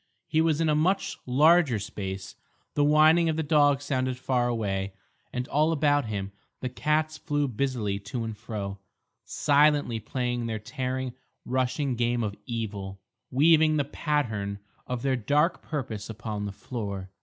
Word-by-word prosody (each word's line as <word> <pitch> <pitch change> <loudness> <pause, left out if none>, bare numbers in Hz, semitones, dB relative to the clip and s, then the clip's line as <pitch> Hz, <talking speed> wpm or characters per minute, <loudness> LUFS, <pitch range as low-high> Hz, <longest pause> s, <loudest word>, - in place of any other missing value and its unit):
He 160 - +2
was 160 -2 +2
in 165 - +2
a 155 - +3
much 175 +6 +1
larger 150 0 +5
space. 95 -1 -6 0.4
The 145 - +2
whining 155 +3 +5
of 160 - 0
the 160 - -1
dog 145 -2 +3
sounded 130 -3 -1
far 125 -1 +1
away, 100 -5 -2 0.4
and 125 +1 -3
all 155 +3 +3
about 145 -3 +2
him 100 -3 -4 0.3
the 130 - -3
cats 155 +4 0
flew 145 -2 0
busily 120 -5 -1
to 115 +4 -4
and 110 -1 -4
fro, 105 -3 -5 0.5
silently 145 -5 +3
playing 120 +1 -2
their 110 -1 -2
tearing, 130 +3 -3 0.3
rushing 130 +1 0
game 120 0 +1
of 105 -2 -3
evil, 100 -5 -4 0.3
weaving 155 +3 +5
the 145 - +1
pattern 115 -10 -1 0.3
of 125 -2 -3
their 135 -1 +2
dark 145 - +1
purpose 115 -9 -4
upon 110 -2 -4
the - - -4
floor. 100 -3 -5
130 Hz, 155 wpm, -27 LUFS, 110-150 Hz, 0.5 s, larger